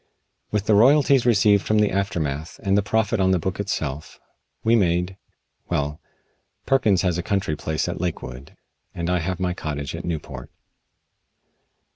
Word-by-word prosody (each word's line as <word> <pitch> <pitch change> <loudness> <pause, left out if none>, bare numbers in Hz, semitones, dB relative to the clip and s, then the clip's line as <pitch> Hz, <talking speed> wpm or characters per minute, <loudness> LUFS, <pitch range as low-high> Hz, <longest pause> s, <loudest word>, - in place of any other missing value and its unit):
With 105 -1 -1
the 110 - +3
royalties 135 +3 +5
received 105 -3 +4
from 110 - +1
the 105 -1 +3
aftermath 80 -6 -2
and 100 -1 +2
the 100 - +4
profit 105 +1 0
on 95 -1 +3
the 95 - +3
book 95 +3 -3
itself, 80 -7 -4 0.4
we 115 +1 +4
made 90 -2 +1 0.5
well, 75 +1 -2 0.6
Perkins 110 -9 +3
has 90 -2 0
a - - 0
country 95 -4 -1
place 80 +1 -2
at - - -4
Lakewood, 70 -7 -5 0.4
and 85 +1 -2
I 90 - +2
have 90 +2 -3
my 90 -1 0
cottage 75 -5 -5
at - - -6
Newport. 80 -3 -5
95 Hz, 155 wpm, -23 LUFS, 80-105 Hz, 0.6 s, royalties